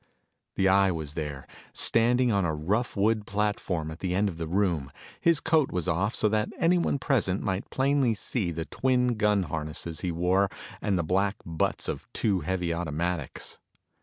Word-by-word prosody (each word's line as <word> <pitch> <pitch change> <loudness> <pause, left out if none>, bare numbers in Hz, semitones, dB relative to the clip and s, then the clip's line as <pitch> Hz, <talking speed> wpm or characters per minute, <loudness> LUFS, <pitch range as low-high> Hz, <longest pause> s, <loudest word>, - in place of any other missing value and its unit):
The 95 - +2
Eye 95 0 +5
was 80 -4 -4
there, 75 -4 -5 0.3
standing 120 +2 +4
on 100 -2 +2
a 80 -3 0
rough 100 +11 -1
wood 105 +1 +1
platform 100 -6 -1
at 80 - -10
one 95 - -1
end 100 +3 +2
of 85 -3 -8
the 80 - -3
room. 85 -6 0 0.3
His 170 -3 +3
coat 160 -3 +2
was 90 -1 -2
off 95 +5 0
so - - +2
that 105 0 0
anyone 170 -3 +2
present 120 -9 0
might 95 -1 -2
plainly 135 -3 +2
see 105 -2 -2
the 80 -1 -4
twin 125 +1 +1
gun 105 -3 +2
harness 75 0 -4 0.2
he 90 - -1
wore 90 +4 +2 0.3
and 100 -3 +1
the 85 - 0
black 95 +5 +1
butts 80 -1 -1
of - - -4
two 100 -4 +1
heavy 90 +1 -1
automatics. 85 -1 -3
95 Hz, 175 wpm, -27 LUFS, 85-110 Hz, 0.3 s, Eye